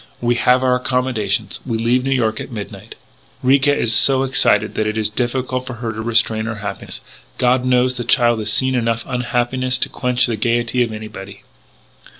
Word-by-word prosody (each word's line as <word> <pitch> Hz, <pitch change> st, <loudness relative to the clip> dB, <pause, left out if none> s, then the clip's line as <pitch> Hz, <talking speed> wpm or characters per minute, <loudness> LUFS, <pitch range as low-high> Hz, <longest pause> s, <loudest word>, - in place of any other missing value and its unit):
We 120 Hz, 0 st, +1 dB
have 125 Hz, +2 st, +2 dB
our 130 Hz, -1 st, +3 dB
accommodations. 125 Hz, -5 st, -1 dB
We 115 Hz, -4 st, -3 dB
leave 120 Hz, +3 st, +1 dB
New 135 Hz, -, -2 dB
York 115 Hz, -5 st, 0 dB
at -, -, -8 dB
midnight. 105 Hz, -4 st, -8 dB, 0.5 s
"Ricca 140 Hz, +2 st, +3 dB
is 115 Hz, -, +1 dB
so 135 Hz, +3 st, +5 dB
excited 135 Hz, 0 st, +2 dB
that 110 Hz, -, -1 dB
it 105 Hz, +1 st, -3 dB
is 110 Hz, -1 st, -1 dB
difficult 125 Hz, +2 st, -2 dB
for 125 Hz, -, -5 dB
her 115 Hz, 0 st, -4 dB
to 110 Hz, 0 st, -6 dB
restrain 110 Hz, -1 st, +1 dB
her 110 Hz, -1 st, -4 dB
happiness. 105 Hz, -1 st, -7 dB, 0.4 s
God 125 Hz, +1 st, +2 dB
knows 125 Hz, 0 st, +2 dB
the 120 Hz, -, -3 dB
child 120 Hz, -1 st, +3 dB
has 110 Hz, 0 st, 0 dB
seen 130 Hz, +4 st, +1 dB
enough 115 Hz, -2 st, -1 dB
unhappiness 125 Hz, +1 st, 0 dB
to -, -, -1 dB
quench 125 Hz, 0 st, +1 dB
the 115 Hz, -3 st, -3 dB
gaiety 120 Hz, +2 st, 0 dB
of 120 Hz, -2 st, 0 dB
anybody! 110 Hz, -2 st, -9 dB
120 Hz, 185 wpm, -18 LUFS, 110-130 Hz, 0.5 s, so